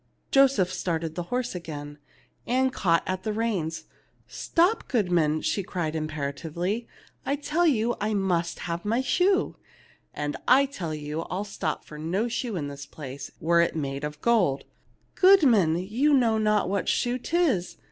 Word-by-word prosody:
Joseph 260 -10 +4
started 165 -3 -2
the 175 - -3
horse 250 0 -1
again. 150 -4 -7 0.5
Ann 260 +1 +2
caught 165 -8 +2
at 185 0 -2
the 215 - -2
reins. 185 -8 -2 0.4
"Stop, 355 +6 +1
goodman," 175 - +1
she 200 - 0
cried, 170 -4 -3
imperatively. 155 +7 -3 0.4
"I 280 - 0
tell 305 +4 +1
you 240 -4 +2
I 215 +1 0
must 175 -4 0
have 170 0 -4
my 230 +4 +1
shoe." 370 +9 +1 0.5
"And 145 0 -3
I 270 +2 +6
tell 180 - -5
you 150 +1 -4
I'll 185 +3 -2
stop 190 -6 -4
for 150 - -10
no 185 +9 -1
shoe 240 -2 -3
in 150 -5 -3
this 140 0 -8
place, 140 -2 -8
were 170 +1 +3
it 170 - 0
made 140 -2 -3
of 150 0 -5
gold." 190 -13 +2 0.3
" - - -39
Goodman, 260 - +6
you 235 +11 +2
know 230 -4 +3
not 210 -2 +2
what 195 +1 -1
shoe 245 +1 0
'tis. 280 - 0
185 Hz, 160 wpm, -26 LUFS, 160-240 Hz, 0.5 s, I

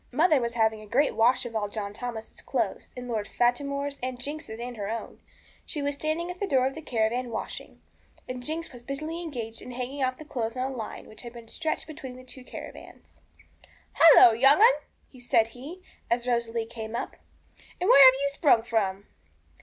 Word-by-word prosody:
Mother 310 -7 +4
was 235 0 -3
having 220 -1 +1
a 215 - -12
great 275 +7 +2
wash 250 +3 +3
of 230 -1 -7
all 210 -2 0
John 205 -1 -5
Thomas's 225 0 -7
clothes, - - -2
and 250 0 -6
Lord 220 -4 -2
Fatimore's 280 +3 0
and 255 0 -4
Jinx's 285 -4 -6
and 245 +1 -5
her 205 -2 -4
own. 230 +1 -5 0.4
She 295 - -5
was 285 0 0
standing 310 +4 -2
at 360 - -10
the 405 - -1
door 260 -5 +3
of 265 - -1
the 320 - -8
caravan 240 -2 -1
washing, 225 - -7 0.4
and 255 0 -5
Jinx 320 +2 -4
was 245 - -10
busily 310 +6 -5
engaged 235 -9 -5
hanging 250 +3 -5
out 255 -1 0
the 310 - -11
clothes 230 -5 -3
on 260 +1 -1
a - - -7
line 225 -3 -6
which 215 - -12
had 240 -1 -9
been 235 -1 -11
stretched 315 +7 -2
between 275 -5 -9
the 255 - -12
two 255 0 -9
caravans. - - -11 0.7
'Halloa, 300 -8 +8
young 275 +6 +7
'un!' 450 - +2
said 225 -2 +2
he, 295 +11 -10 0.3
as 235 +1 0
Rosalie 235 -2 -1
came 225 0 -7
up; - - -4 0.6
'and 360 - 0
where 280 - +9
have 260 0 +8
you 280 - +2
sprung 280 -5 +3
from?' 200 -4 -1
250 Hz, 195 wpm, -27 LUFS, 230-280 Hz, 0.7 s, where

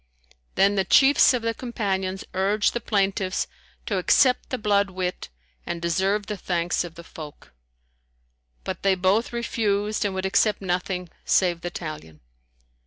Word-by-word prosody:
Then 195 +1 +4
the 195 -1 +1
chiefs 270 +9 +6
of 250 -3 -1
the 230 0 0
Companions 195 -6 -3
urged 200 +3 +1
the 240 - -3
plaintiffs 195 -3 0 0.4
to - - -1
accept 255 -2 +3
the 255 - -2
blood 200 -2 +2
wit 185 -1 -4 0.3
and 170 - -4
deserve 190 +5 0
the 210 -1 -5
thanks 175 -1 -1
of 170 -2 -9
the 170 - -10
folk; 155 - -11 1.1
but 185 -2 -5
they 195 -1 +3
both 190 +5 +1
refused 215 -3 -1
and 200 -2 -2
would 190 0 -2
accept 200 +2 +2
nothing 180 -1 -2 0.2
save 175 -3 +2
the 175 - -3
talion. 155 - -8
195 Hz, 150 wpm, -24 LUFS, 180-210 Hz, 1.1 s, chiefs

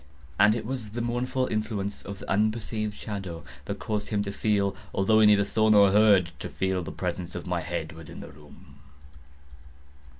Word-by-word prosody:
And 105 +2 +6
it 110 -2 -4
was 120 -3 -4
the 120 +3 -4
mournful 125 +2 -1
influence 110 -3 -3
of 100 -1 -7
the - - -10
unperceived 110 +1 0
shadow 95 -6 -6 0.2
that 100 - -4
caused 105 -1 -3
him 105 -2 0
to 100 - -4
feel—although 100 +1 +1
he 110 - +7
neither 100 -1 +5
saw 110 +1 +2
nor 100 -2 +6
heard—to 95 -7 +3
feel 95 -1 -1
the 85 - -6
presence 90 -1 -4
of 90 - -5
my 90 -2 -1
head 85 -1 -4
within 80 -2 -10
the - - -9
room. 70 0 -17
100 Hz, 170 wpm, -27 LUFS, 90-110 Hz, 0.2 s, he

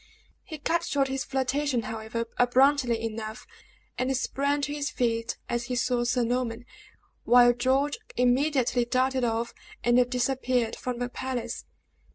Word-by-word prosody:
He 315 - -8
cut 335 +3 0
short 275 -1 0
his 265 0 -2
flirtation, 270 -1 0
however, 225 +1 -4
abruptly 250 -1 +4
enough, 220 -1 -5 0.5
and 260 +1 +1
sprang 280 +3 0
to 285 +1 -2
his 290 -1 -2
feet 230 -1 -1
as 240 0 -2
he 250 - -3
saw 245 -1 +1
Sir 245 0 +1
Norman, 240 0 -2 0.6
while 245 0 +6
George 265 +4 +1 0.2
immediately 250 0 +2
darted 255 +1 +1
off 230 0 -1 0.3
and 245 +1 +4
disappeared 250 -2 0
from 250 -1 -4
the 245 0 -2
palace. 255 0 -4
250 Hz, 140 wpm, -27 LUFS, 240-270 Hz, 0.6 s, while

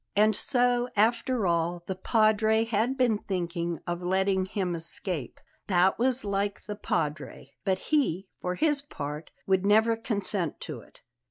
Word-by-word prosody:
And 215 +1 +4
so, 245 0 +2
after 230 +1 +2
all, 170 0 0
the 190 - -3
Padre 220 +2 +2
had 230 +4 0
been 240 -5 +2
thinking 170 -3 -3
of 175 0 -3
letting 190 +1 +1
him 190 -3 -2
escape! 165 - -2 0.3
That 185 +1 +3
was 255 -1 +1
like 200 0 -2
the 210 - -5
Padre. 155 -7 -3
But 190 -2 +2 0.2
he, 195 - +1
for 180 0 -2
his 295 - +2
part, 150 - -6 0.2
would 190 -1 +2
never 220 +3 +4
consent 200 - -2
to 150 -6 -5
it. - - -21
200 Hz, 150 wpm, -28 LUFS, 175-225 Hz, 0.3 s, And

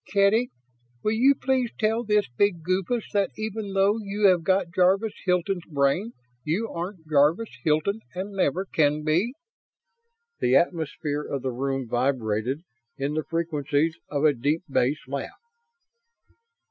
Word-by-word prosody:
Kedy, 205 +5 +3 0.5
will 215 - +2
you 260 +6 +4
please 260 -2 0
tell 225 +2 +1
this 210 -2 +2
big 170 +6 0
goofus 190 +6 0
that 200 -1 +2
even 215 -2 -4
though 200 +3 +3
you 205 0 -1
have 180 -2 +3
got 185 0 +1
Jarvis 195 +4 +3
Hilton's 180 0 0
brain 150 +10 +1 0.3
you 180 +9 -1
aren't 170 -1 -6
Jarvis 155 +9 +3
Hilton 160 +8 +1 0.2
and 190 +3 -4
never 190 -1 0
can 150 -4 +1
be?" 175 - +1 1.0
The 125 - +3
atmosphere 155 -2 0
of 140 -3 -4
the 130 - -1
room 135 +1 -2
vibrated 120 +2 -1 0.3
in 140 +2 -2
the 155 0 -1
frequencies 160 -1 0
of 145 +1 0
a 150 - +5
deep 145 +7 -1
bass 135 +1 0
laugh. 140 0 -5
170 Hz, 140 wpm, -25 LUFS, 145-200 Hz, 1.0 s, a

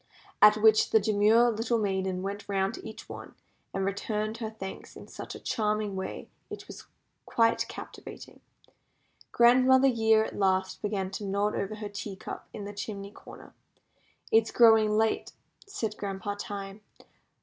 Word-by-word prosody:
At 210 0 +8
which 220 0 +5
the 220 - +5
demure 215 +3 +4
little 225 +2 0
maiden 190 -3 -1
went 200 +1 -5
round 195 +1 0
to - - -9
each 220 - -11
one, - - -10 0.4
and 195 0 -2
returned 215 +2 -2
her 225 -2 -4
thanks 195 -3 -9
in - - -11
such - - -8
a - - -8
charming 210 -2 -1
way 190 - -5 0.2
it - - -8
was - - -11 0.4
quite 230 -1 +2
captivating. - - -10 0.9
Grandmother 255 +2 +5
Year 220 -2 +3
at - - -7
last 190 -1 0
began 195 -2 -2
to 200 - -5
nod 200 +2 0
over 200 +2 -3
her 210 -1 -6
teacup 205 -1 -7
in 205 - -7
the 205 - -7
chimney 200 -1 -6
corner. - - -14 0.8
"It 225 - +6
is - - -6
growing 225 -2 +6
late," 220 0 0 0.3
said 225 - -4
Grandpa 200 0 -4
Time. 200 0 -6
210 Hz, 155 wpm, -28 LUFS, 195-220 Hz, 0.9 s, At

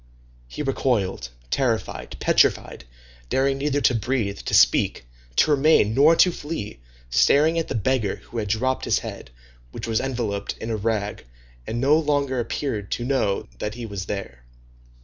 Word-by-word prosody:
He 105 - -5
recoiled, 110 - -1 0.2
terrified, 115 - -2
petrified, - - +2 0.4
daring 135 +1 +1
neither 145 0 0
to 130 - +4
breathe, 115 -3 -1
to - - -5
speak, - - +3 0.3
to 155 - +4
remain, 145 -7 +4
nor 145 +6 +6
to 180 - +5
flee, 145 - -6 0.3
staring 150 - +4
at 165 - -3
the - - -4
beggar 110 -1 0
who 115 - -8
had 105 - -3
dropped 130 +5 0
his - - +2
head, - - -7 0.4
which 110 - -6
was 115 -1 0
enveloped 115 -6 -3
in 115 - -4
a - - 0
rag, 105 - -2 0.4
and 115 - -3
no 145 +5 +4
longer 145 -4 0
appeared 115 -4 -3
to 120 - -3
know 120 -7 0
that 105 +1 -4
he 120 -1 -6
was 100 -4 -5
there. 95 -13 -6
120 Hz, 160 wpm, -23 LUFS, 100-135 Hz, 0.4 s, nor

